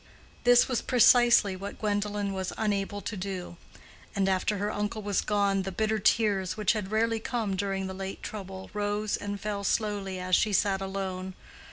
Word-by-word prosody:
This 245 0 +6
was 250 -4 0
precisely 240 -4 +5
what 200 +2 -7
Gwendolen 205 -1 -1
was 190 -1 -3
unable 205 -1 -1
to 210 - -5
do; 185 -2 -5 0.6
and 195 -1 +1
after 190 +2 +1
her 205 +2 -1
uncle 210 +1 -3
was 205 -1 +1
gone, 200 -2 +1
the 195 +1 -4
bitter 220 +3 0
tears, 200 -3 +2
which 215 0 +2
had 210 -4 -3
rarely 225 +1 +1
come 220 -4 -2
during 195 0 -2
the 190 - -5
late 190 0 -6
trouble, 190 -2 -7
rose 205 0 -1
and 205 0 -5
fell 205 -1 -3
slowly 200 -3 -1
as 185 0 +2
she 210 +3 +2
sat 195 0 +2
alone. 190 -1 -4
200 Hz, 175 wpm, -28 LUFS, 190-215 Hz, 0.6 s, This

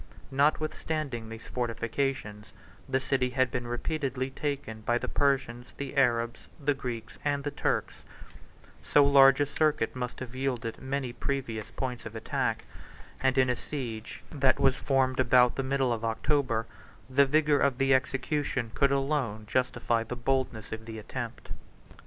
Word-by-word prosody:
Notwithstanding 145 -3 0
these 115 0 -9
fortifications, 115 -2 -2 0.4
the 130 0 +2
city 130 -1 0
had 130 -1 +1
been 120 0 -3
repeatedly 130 +1 -2
taken 140 -7 -4
by 120 +2 +1
the - - -3
Persians, 125 -4 0
the 140 0 -5
Arabs, 120 -3 +1
the 145 0 +2
Greeks, 125 -4 -6
and 145 -1 0
the 145 - -2
Turks; - - -1 0.9
so 145 - +5
large 135 -1 +7
a 145 - +3
circuit 145 -5 +1
must 125 -1 -4
have 125 -2 -7
yielded 125 -4 -2
many 130 -2 -2
pervious 120 -6 -3
points 125 -3 -3
of 110 - -10
attack; 110 - -1 0.6
and 130 0 +2
in 130 -1 +5
a 125 - +1
siege 120 -6 -6
that 135 -3 +3
was 135 - +4
formed 135 -2 +1
about 125 -1 +5
the - - 0
middle 135 -2 +1
of 115 -1 -4
October, 115 0 +1 0.4
the 135 +2 +4
vigor 150 0 +3
of 140 -3 +2
the 135 0 +3
execution 130 -3 0
could 140 -1 +3
alone 135 -6 0
justify 120 -1 0
the 115 +2 -5
boldness 125 -3 -1
of 110 0 -6
the 110 -1 -6
attempt. 110 - -6
130 Hz, 150 wpm, -29 LUFS, 120-140 Hz, 0.9 s, large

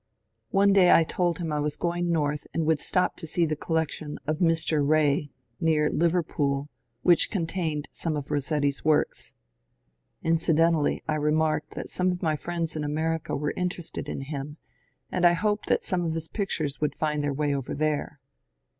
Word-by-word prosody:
One 200 +1 +4
day 185 -3 +6
I 165 - +7
told 175 +1 0
him 165 -3 -3
I 150 - 0
was 150 0 -2
going 175 0 -1
north 150 -2 0
and 165 - +1
would 160 -1 +2
stop 180 +5 0
to 165 - -7
see 170 +2 +2
the 155 -1 -1
collection 155 -1 -2
of 155 +1 -1
Mr. 160 -3 +2
Rae, 145 0 +2 0.3
near 155 -3 +2
Liver 170 +1 +2
pool, 140 -1 -1 0.3
which 175 -2 +4
contained 165 -5 -2
some 160 -3 -2
of 140 -1 -6
Rossetti's 145 -1 0
works. 155 -1 +1 0.9
Incident 165 0 +3
ally 150 -3 +1
I 155 - +1
remarked 155 0 0
that - - -5
some 180 0 0
of 180 0 -5
my 155 -2 +2
friends 165 +1 -3
in 155 - -2
America 160 +2 -1
were 150 +1 -1
interested 180 -2 -4
in - - -4
him 145 +1 -6 0.5
and 180 - -1
I 175 0 +7
hoped 210 +4 0
that - - +2
some 185 -2 0
of 165 -1 -1
his 160 0 -4
pictures 155 -9 -3
would 150 -1 0
find 150 -1 -1
their 145 - 0
way 145 +1 0
over 135 -2 -3
there. 150 0 -1
155 Hz, 180 wpm, -27 LUFS, 150-170 Hz, 0.9 s, I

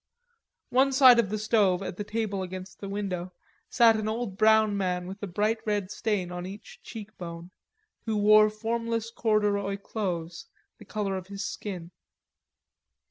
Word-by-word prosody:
One 265 +2 +4
side 260 -3 +8
of 215 -5 +2
the 215 - -2
stove 205 -4 +2
at 185 - -5
the 205 - -4
table 205 -2 -2
against 185 0 -7
the 200 - -6
window, 185 -3 -4 0.4
sat 230 -2 +5
an 215 -1 -2
old 220 -2 -3
brown 220 0 +4
man 180 -2 -1
with 190 +3 -8
a 205 - -3
bright 210 +5 0
red 205 -3 -1
stain 205 -6 -1
on 180 0 -5
each 200 +2 -11
cheek 215 -2 -9
bone, 170 0 -8 0.6
who 220 -1 0
wore 215 +1 +6
formless 230 +1 -2
corduroy 205 -3 +1
clothes, 175 -5 -4 0.3
the - - -13
color 200 -3 -2
of 185 -1 -8
his 200 +1 -5
skin. 180 -4 -6
205 Hz, 160 wpm, -27 LUFS, 185-220 Hz, 0.6 s, side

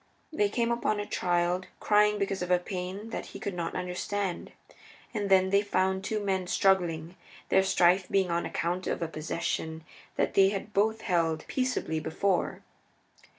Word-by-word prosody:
They 205 -8 +2
came 235 +2 0
upon 225 -3 0
a 205 - -2
child 175 0 0
crying 210 0 +4
because 195 -1 -2
of 180 - -3
a 180 - +5
pain 185 +4 -5
that - - -4
he - - -9
could 200 - -4
not 170 -2 -3
understand. 180 +1 -3 0.6
And 205 -3 -2
then 190 -1 +4
they 200 0 +5
found 190 -1 0
two 215 +1 -1
men 190 -3 -1
struggling, 175 -3 +1 0.3
their - - +5
strife 185 -1 +3
being 190 -3 +2
on 170 0 0
account 175 +2 -2
of - - -1
a - - -1
possession 160 0 -3 0.3
that - - 0
they 195 0 +6
had 205 +1 -5
both 220 +2 +2
held 165 -5 0
peaceably 255 -11 -1
before. 175 +4 -1
190 Hz, 165 wpm, -29 LUFS, 175-205 Hz, 0.6 s, they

